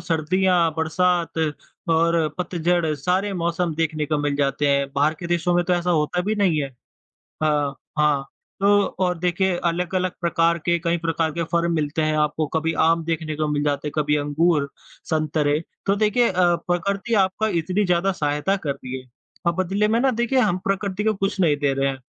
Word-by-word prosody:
सर्दियाँ, 175 Hz, +1 st, +1 dB
बरसात 170 Hz, +1 st, 0 dB, 0.5 s
और 165 Hz, 0 st, +2 dB
पतझड़ 175 Hz, -2 st, 0 dB
सारे 180 Hz, +8 st, -1 dB
मौसम 170 Hz, -2 st, -1 dB
देखने 155 Hz, -1 st, -1 dB
को 150 Hz, 0 st, 0 dB
मिल 145 Hz, -1 st, -1 dB
जाते 145 Hz, 0 st, +1 dB
हैं। 140 Hz, 0 st, +2 dB
बाहर 145 Hz, +3 st, +2 dB
के 175 Hz, -, -4 dB
देशों 175 Hz, 0 st, +1 dB
में 175 Hz, 0 st, +2 dB
तो 180 Hz, -, 0 dB
ऐसा 175 Hz, 0 st, -1 dB
होता 165 Hz, +1 st, +1 dB
भी 210 Hz, +4 st, -1 dB
नहीं 185 Hz, -7 st, +2 dB
है 135 Hz, -, -3 dB, 0.7 s
अ, 150 Hz, -2 st, +1 dB, 0.3 s
हाँ 150 Hz, -2 st, +2 dB, 0.4 s
तो 200 Hz, -, +3 dB, 0.4 s
और 180 Hz, -2 st, 0 dB
देखिए 180 Hz, +1 st, +1 dB
अलग-अलग 180 Hz, +2 st, 0 dB
प्रकार 170 Hz, -1 st, +2 dB
के 170 Hz, 0 st, +3 dB
कई 170 Hz, 0 st, 0 dB
प्रकार 165 Hz, -1 st, -1 dB
के 170 Hz, +2 st, -2 dB
फल 170 Hz, 0 st, +2 dB
मिलते 155 Hz, -1 st, -1 dB
हैं 155 Hz, 0 st, +1 dB
आपको, 150 Hz, +1 st, 0 dB
कभी 160 Hz, +2 st, -1 dB
आम 165 Hz, +1 st, +2 dB
देखने 160 Hz, -2 st, -3 dB
को 155 Hz, -1 st, -1 dB
मिल 145 Hz, -1 st, 0 dB
जाते 145 Hz, 0 st, -1 dB
हैं, -, -, -7 dB
कभी 150 Hz, -1 st, +2 dB
अंगूर, 150 Hz, 0 st, +1 dB, 0.4 s
संतरे। 155 Hz, -1 st, 0 dB, 0.3 s
तो 195 Hz, -, +2 dB
देखिए 215 Hz, +3 st, +2 dB
अ, -, -, -2 dB, 0.4 s
प्रकृति 200 Hz, +6 st, -1 dB
आपका 205 Hz, +4 st, -1 dB
इतनी 180 Hz, +2 st, 0 dB
ज़्यादा 180 Hz, +2 st, +2 dB
सहायता 150 Hz, +4 st, 0 dB
कर 155 Hz, -7 st, -4 dB
रही 130 Hz, -1 st, -7 dB
है, 130 Hz, -, -17 dB, 0.4 s
अब 170 Hz, -, +2 dB
बदले 195 Hz, +3 st, +1 dB
में 225 Hz, +2 st, +2 dB
ना 265 Hz, +1 st, +3 dB
देखिए 240 Hz, +2 st, 0 dB
हम 205 Hz, -7 st, +2 dB
प्रकृति 195 Hz, +1 st, -1 dB
को 220 Hz, 0 st, +2 dB
कुछ 195 Hz, +1 st, -2 dB
नहीं 155 Hz, -5 st, +3 dB
दे 145 Hz, -1 st, 0 dB
रहे 135 Hz, 0 st, +1 dB
हैं, 135 Hz, -1 st, -4 dB
170 Hz, 190 wpm, -22 LUFS, 150-185 Hz, 0.7 s, तो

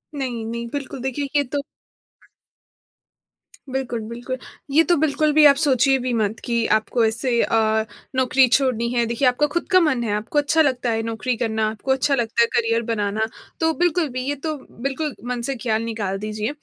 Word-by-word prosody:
नहीं, 245 Hz, -5 st, -3 dB
नहीं 235 Hz, +1 st, -4 dB
बिल्कुल 275 Hz, -2 st, -5 dB
देखिए 265 Hz, +2 st, -2 dB
ये 285 Hz, -, +4 dB
तो 280 Hz, +2 st, -3 dB, 2.1 s
बिल्कुल, 260 Hz, -3 st, -2 dB
बिल्कुल। 245 Hz, +2 st, -5 dB, 0.3 s
ये 315 Hz, +4 st, +5 dB
तो 345 Hz, -, +3 dB
बिल्कुल 305 Hz, 0 st, +2 dB
भी 310 Hz, 0 st, +6 dB
आप 280 Hz, -1 st, +8 dB
सोचिए 275 Hz, -2 st, +3 dB
भी 250 Hz, 0 st, -2 dB
मत 220 Hz, -1 st, -1 dB
कि 235 Hz, -2 st, 0 dB
आपको 230 Hz, +2 st, -1 dB
ऐसे 235 Hz, +2 st, +1 dB
अ, 220 Hz, -1 st, +2 dB, 0.3 s
नौकरी 260 Hz, 0 st, +4 dB
छोड़नी 245 Hz, -2 st, +1 dB
है, 235 Hz, -1 st, +2 dB
देखिए 235 Hz, +3 st, +1 dB
आपका 250 Hz, +4 st, +2 dB
ख़ुद 345 Hz, +4 st, -3 dB
का 370 Hz, -, +7 dB
मन 300 Hz, -8 st, +1 dB
है 215 Hz, -3 st, -1 dB
आपको 215 Hz, +8 st, 0 dB
अच्छा 300 Hz, +2 st, +2 dB
लगता 255 Hz, -4 st, +1 dB
है 225 Hz, 0 st, 0 dB
नौकरी 230 Hz, +2 st, -2 dB
करना, 220 Hz, -1 st, 0 dB
आपको 220 Hz, +5 st, -3 dB
अच्छा 270 Hz, +1 st, +2 dB
लगता 235 Hz, -2 st, 0 dB
है 235 Hz, -, +5 dB
करियर 230 Hz, 0 st, +2 dB
बनाना, 220 Hz, -1 st, -1 dB, 0.3 s
तो 320 Hz, 0 st, +2 dB
बिल्कुल 350 Hz, -1 st, +2 dB
भी 255 Hz, -, -1 dB
ये 290 Hz, -, 0 dB
तो 310 Hz, -1 st, -1 dB, 0.3 s
बिल्कुल 275 Hz, +1 st, -2 dB, 0.2 s
मन 245 Hz, -, -2 dB
से 270 Hz, -, -1 dB
ख़्याल 225 Hz, -2 st, -1 dB
निकाल 210 Hz, -4 st, -3 dB
दीजिए। 215 Hz, +2 st, -3 dB
245 Hz, 190 wpm, -22 LUFS, 225-280 Hz, 2.1 s, आप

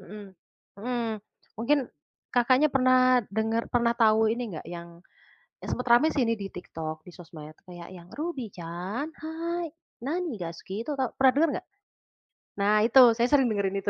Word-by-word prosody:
Mhm. 210 Hz, +2 st, -10 dB, 0.5 s
Mhm 235 Hz, 0 st, -2 dB, 0.5 s
mungkin 285 Hz, +6 st, +2 dB, 0.5 s
Kakaknya 255 Hz, +4 st, +3 dB
pernah 255 Hz, -2 st, +4 dB
dengar 225 Hz, +2 st, -1 dB
pernah 235 Hz, -1 st, +2 dB
tahu 220 Hz, -1 st, +4 dB
ini 230 Hz, -1 st, -2 dB
enggak 160 Hz, -, -8 dB
yang 170 Hz, 0 st, -9 dB, 0.6 s
sempet 250 Hz, -, -4 dB
rame 240 Hz, +5 st, +5 dB
sih 280 Hz, -5 st, +1 dB
ini 230 Hz, -, +1 dB
di 200 Hz, -3 st, -4 dB
TikTok, 160 Hz, -3 st, -7 dB
di 180 Hz, -, -13 dB
sosmed 160 Hz, -3 st, -11 dB, 0.2 s
kayak 175 Hz, 0 st, -10 dB
yang, 175 Hz, -1 st, -12 dB
"Ruby-chan, 225 Hz, -, -5 dB
hai! 335 Hz, +2 st, -4 dB, 0.3 s
Nani 325 Hz, +6 st, -2 dB
daisuki" 175 Hz, +4 st, -6 dB
itu 290 Hz, +4 st, -4 dB
tau 260 Hz, -3 st, -1 dB
pernah 265 Hz, -1 st, +4 dB
denger 320 Hz, +3 st, +4 dB
enggak? -, -, -6 dB, 1.0 s
Nah 205 Hz, +1 st, +3 dB
itu 250 Hz, +3 st, +7 dB, 0.2 s
saya 235 Hz, -, +3 dB
sering 270 Hz, -2 st, +3 dB
dengerin 200 Hz, -2 st, -1 dB
itu. -, -, -1 dB
230 Hz, 155 wpm, -27 LUFS, 190-265 Hz, 1.0 s, itu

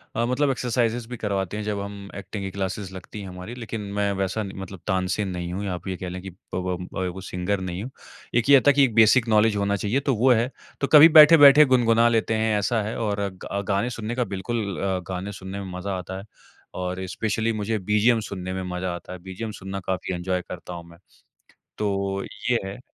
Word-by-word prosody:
अ, 115 Hz, +1 st, +1 dB
मतलब 135 Hz, +3 st, +1 dB
एक्सरसाइज़ेज़ 120 Hz, -2 st, -1 dB
भी 125 Hz, -, -6 dB
करवाते 100 Hz, -1 st, -2 dB
हैं 105 Hz, -, -3 dB
जब 105 Hz, -1 st, -2 dB
हम 100 Hz, 0 st, -8 dB
ऐक्टिंग 100 Hz, 0 st, -6 dB
की 95 Hz, -, -4 dB
क्लासेस 95 Hz, 0 st, -4 dB
लगती 95 Hz, +3 st, -9 dB
हैं 95 Hz, -, -7 dB
हमारी, 90 Hz, +6 st, -8 dB
लेकिन 115 Hz, -2 st, -5 dB
मैं 100 Hz, 0 st, 0 dB
वैसा 95 Hz, +3 st, -1 dB
न 95 Hz, -, -6 dB
मतलब 95 Hz, -1 st, -8 dB
तानसेन 95 Hz, +1 st, 0 dB
नहीं 90 Hz, -1 st, -4 dB
हूँ 100 Hz, +2 st, -3 dB
या 95 Hz, -, -2 dB
आप 90 Hz, -, -7 dB
ये 95 Hz, -, -2 dB
कह 90 Hz, -, -5 dB
लें 90 Hz, 0 st, -6 dB
कि 95 Hz, -, -7 dB, 0.3 s
प 90 Hz, 0 st, -3 dB
व 95 Hz, -1 st, -2 dB
वो 95 Hz, -, -8 dB
सिंगर 95 Hz, +2 st, -2 dB
नहीं 90 Hz, +2 st, -4 dB
हूँ। 130 Hz, -, -7 dB, 0.4 s
एक 120 Hz, +3 st, +2 dB
ये 140 Hz, -2 st, +8 dB
था -, -, +9 dB
कि 140 Hz, 0 st, +4 dB
एक 120 Hz, -5 st, +2 dB
बेसिक 115 Hz, +2 st, +5 dB
नॉलेज 110 Hz, 0 st, +4 dB
होना 100 Hz, 0 st, +1 dB
चाहिए 105 Hz, +7 st, 0 dB
तो 135 Hz, -3 st, 0 dB
वो 125 Hz, +4 st, +4 dB
है, 120 Hz, +3 st, +2 dB, 0.3 s
तो 140 Hz, -, +1 dB
कभी 155 Hz, +2 st, +9 dB
बैठे-बैठे 150 Hz, -2 st, +9 dB
गुनगुना 120 Hz, -3 st, +4 dB
लेते 115 Hz, -1 st, +1 dB
हैं 110 Hz, -1 st, +1 dB
ऐसा 110 Hz, +2 st, 0 dB
है 110 Hz, +2 st, -4 dB
और 105 Hz, -3 st, -1 dB
ग 95 Hz, -, -13 dB
अ, 100 Hz, 0 st, -1 dB
गाने 100 Hz, +4 st, +1 dB
सुनने 115 Hz, 0 st, -4 dB
का 125 Hz, -, +1 dB
बिल्कुल 110 Hz, +4 st, -2 dB, 0.2 s
अ, 95 Hz, -1 st, -1 dB
गाने 95 Hz, +2 st, -4 dB
सुनने 95 Hz, +1 st, -7 dB
में 95 Hz, -, -7 dB
मज़ा 95 Hz, 0 st, -3 dB
आता 95 Hz, +1 st, -6 dB
है -, -, -9 dB, 0.5 s
और 90 Hz, +1 st, -3 dB
स्पेशली 110 Hz, +2 st, -1 dB
मुझे 110 Hz, +1 st, -1 dB
बीजीएम 105 Hz, +4 st, +3 dB
सुनने 95 Hz, -3 st, -5 dB
में 95 Hz, 0 st, -3 dB
मज़ा 90 Hz, 0 st, -2 dB
आता 90 Hz, -, -9 dB
है, 90 Hz, -, -8 dB
बीजीएम 95 Hz, +5 st, -6 dB
सुनना 95 Hz, 0 st, -6 dB
काफ़ी 95 Hz, 0 st, -2 dB
इन्जॉय 90 Hz, +1 st, -2 dB
करता 90 Hz, 0 st, -7 dB
हूँ 85 Hz, -1 st, -7 dB
मैं, 85 Hz, -, -15 dB, 0.8 s
तो 100 Hz, -1 st, -1 dB, 0.3 s
ये 120 Hz, -, +3 dB
है। 95 Hz, +6 st, -7 dB
100 Hz, 230 wpm, -24 LUFS, 95-115 Hz, 0.8 s, था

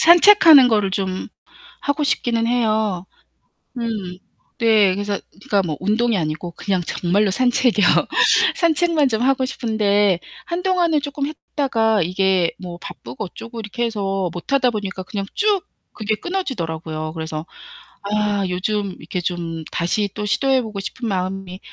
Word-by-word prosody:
산책하는 335 Hz, -6 st, +8 dB
것을 210 Hz, -4 st, +2 dB
좀 190 Hz, -1 st, -3 dB, 0.5 s
하고 290 Hz, +1 st, -1 dB
싶기는 235 Hz, -6 st, 0 dB
해요. 215 Hz, -6 st, 0 dB, 0.7 s
음. 215 Hz, -6 st, -4 dB, 0.4 s
네, 215 Hz, -5 st, +4 dB
그래서 205 Hz, +1 st, -2 dB
그니까 200 Hz, 0 st, -1 dB
뭐 155 Hz, -4 st, -3 dB
운동이 220 Hz, +4 st, +1 dB
아니고 160 Hz, 0 st, -3 dB
그냥 190 Hz, +1 st, -1 dB
정말로 195 Hz, +4 st, +1 dB
산책이요. 245 Hz, -1 st, +2 dB, 0.7 s
산책만 330 Hz, -3 st, +2 dB
좀 225 Hz, -2 st, -1 dB
하고 265 Hz, 0 st, +2 dB
싶은데 205 Hz, -7 st, +1 dB, 0.3 s
한동안은 350 Hz, -3 st, +1 dB
쪼끔 285 Hz, -1 st, -3 dB
했다가 240 Hz, -8 st, 0 dB
이게 185 Hz, 0 st, +1 dB
뭐 175 Hz, -2 st, -8 dB
바쁘고 125 Hz, -, -8 dB
어쩌고 230 Hz, +5 st, -9 dB
이렇게 220 Hz, +3 st, -3 dB
해서 195 Hz, -5 st, -2 dB
못하다 250 Hz, +8 st, +1 dB
보니까 200 Hz, -3 st, -4 dB
그냥 195 Hz, +1 st, -5 dB
쭉 410 Hz, -2 st, +1 dB, 0.3 s
그게 215 Hz, -1 st, -2 dB
끊어지더라고요. 165 Hz, -, -4 dB
그래서 160 Hz, -1 st, -5 dB, 0.6 s
아, 205 Hz, 0 st, 0 dB
요즘 195 Hz, +1 st, -2 dB
이렇게 180 Hz, -, -4 dB
좀 170 Hz, -2 st, -4 dB
다시 200 Hz, +4 st, 0 dB
또 210 Hz, -, -3 dB
시도해 265 Hz, +5 st, +2 dB
보고 215 Hz, -3 st, -6 dB
싶은 235 Hz, +4 st, -5 dB
마음이 190 Hz, -1 st, -3 dB
210 Hz, 305 characters per minute, -20 LUFS, 185-250 Hz, 0.7 s, 산책하는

